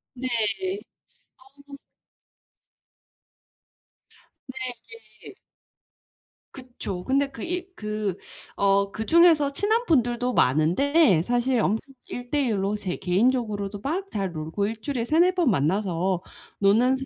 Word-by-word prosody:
네. 255 +1 -4 1.2
어 280 +1 -15 2.7
근데 260 0 -8 0.6
이게 - - -12 1.2
그쵸. 240 -8 -7
근데 275 +1 +1
그 - - -9
이 360 +1 -3
그 210 - -3 0.4
어 200 0 +2
그중에서 310 - +4
친한 440 +9 +1
분들도 245 -4 +1
많은데 180 - +3
사실 245 +2 +1
엄청 225 +7 -1
1 245 0 -7
대 290 0 +1
1 210 -3 0
로 200 +2 0
제 195 -4 -3
개인적으로도 205 0 0
막 365 - -3
잘 195 -3 -3
놀고 160 +6 -3
1 220 +1 -5
주일에 255 -2 -2
3-4 345 +8 +3
번 340 -8 +3
만나서 185 +2 0 0.4
노는 230 +7 +4
사람도 270 - -5
240 Hz, 195 characters per minute, -25 LUFS, 195-280 Hz, 2.7 s, 그중에서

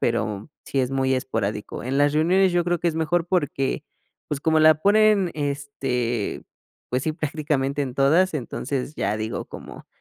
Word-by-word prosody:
pero 110 0 -1 0.2
sí 135 - 0
es 125 0 -1
muy 135 -1 +1
esporádico. 105 -5 -3
En 130 +3 -2
las 145 +1 +3
reuniones 180 +5 +3
yo 175 0 +2
creo 175 0 0
que 170 - +1
es 165 - -2
mejor 160 +1 0
porque, 145 -5 -1 0.4
pues, 150 -3 -3
como 160 +1 +2
la 155 0 +7
ponen, 205 +2 +3
este, 135 -6 -2 0.5
pues 125 +1 0
sí, 155 - 0
prácticamente 145 -2 -1
en 130 -3 -4
todas, 160 +8 +3
entonces 140 +1 -3
ya 100 -4 -1
digo 110 +1 -3
como: - - -11
145 Hz, 170 wpm, -24 LUFS, 130-160 Hz, 0.5 s, la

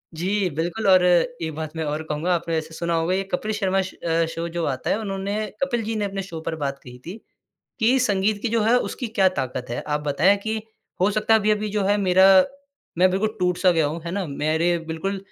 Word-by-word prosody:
जी 190 +3 0
बिल्कुल 170 +8 -2
और 185 -1 +6
एक 175 -2 +1
बात 155 0 -6
मैं 160 - -2
और 150 +2 -3
कहूँगा 155 +3 -1
आपने 170 0 -3
वैसे 160 0 -4
सुना 170 +1 -2
होगा 165 +3 0
ये 195 +1 0
कपिल 215 +4 -1
शर्मा 195 -2 +1
श 185 - -5 0.2
अ, 165 0 +2
शो 165 +1 -4
जो 170 0 -3
आता 130 -2 -2
है - - +2
उन्होंने 195 -1 -3 0.3
कपिल 240 -4 -1
जी 220 +1 -3
ने 210 - -1
अपने 195 -1 -3
शो 170 -4 -7
पर 160 - -2
बात 140 -3 -3
कही 125 -1 -11
थी 180 +6 -7 0.6
कि 235 +4 +4
संगीत 205 -3 +1
की 235 - -1
जो 230 0 +1
है 230 +3 +4
उसकी 245 -1 -3
क्या 200 -4 +3
ताकत 130 -1 -3
है। 120 - -3
आप 150 0 -2
बताएँ 155 +8 +3
कि 220 0 -2 0.4
हो 195 - +4
सकता 215 +1 +2
है 220 - +6
अभी-अभी 210 0 +1
जो 205 0 -1
है 205 +1 +3
मेरा 190 -1 +4 0.7
मैं 185 +1 +5
बिल्कुल 215 +4 -1
टूट-सा 180 0 +2
गया 165 -3 +2
हूँ। 160 +2 -5
है 170 - -3
ना? 195 0 -2
मेरे 160 +4 0
बिल्कुल 195 +5 -3
185 Hz, 230 wpm, -23 LUFS, 160-205 Hz, 0.7 s, और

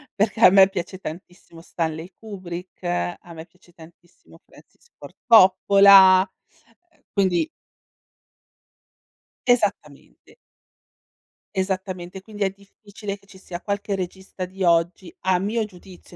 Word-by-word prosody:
perché 210 +1 -1
a - - +10
me 190 0 +6
piace 190 0 -6
tantissimo 170 -1 -11
Stanley 165 0 -5
Kubrick, 185 -4 -9
a 175 -1 -4
me 160 0 -10
piace 180 -1 -26
tantissimo 170 +2 -19
Francis 470 - -22
Ford - - -13
Coppola, 195 -2 +7 0.7
ehm, 315 - -33
quindi 190 - +1 2.0
Esattamente. 195 - -2 1.2
Esattamente, 185 -1 -4
quindi 210 0 -6
è 195 - +1
difficile 200 +1 -10
che 200 - -27
ci 190 - -16
sia 175 -2 -8
qualche 200 +1 -4
regista 190 0 -6
di 190 +1 -7
oggi, 170 +1 0
a 185 -1 +2
mio 215 +3 -1
giudizio, 180 -2 -16
190 Hz, 115 wpm, -22 LUFS, 175-200 Hz, 2.0 s, a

